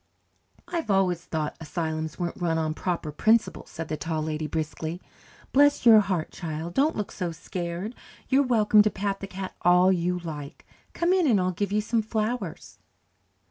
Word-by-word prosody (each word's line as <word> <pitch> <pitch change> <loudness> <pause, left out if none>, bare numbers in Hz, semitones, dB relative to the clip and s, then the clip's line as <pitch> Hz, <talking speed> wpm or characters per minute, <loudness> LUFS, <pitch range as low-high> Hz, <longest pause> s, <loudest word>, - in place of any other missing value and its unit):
"I've 340 -7 -3
always 185 -4 +2
thought 155 -2 -3
asylums 160 -1 -3
weren't 175 0 -4
run 165 -2 +1
on 155 -1 0
proper 170 -2 -3
principles," 220 +9 +1
said 165 -1 -6
the 155 - -3
Tall 155 +2 -2
Lady 155 0 -3
briskly. 160 +2 -3 0.5
"Bless 290 -1 +4
your 225 -2 +9
heart, 185 -6 -1
child, 165 -1 -5
don't 295 - +2
look 210 - -3
so 175 -2 -3
scared. 175 +4 -5 0.3
You're 270 +2 +4
welcome 220 -5 +5
to 215 - +3
pat 195 -1 -2
the 195 - -6
cat 190 0 -6
all 180 +1 +5
you 180 0 0
like. 150 -5 -7 0.3
Come 345 +2 +2
in 365 -4 +3
and 220 -7 +4
I'll 185 0 +1
give 200 +2 -2
you 210 +1 +2
some 225 +1 0
flowers." 215 -3 -3
180 Hz, 175 wpm, -26 LUFS, 160-215 Hz, 0.5 s, your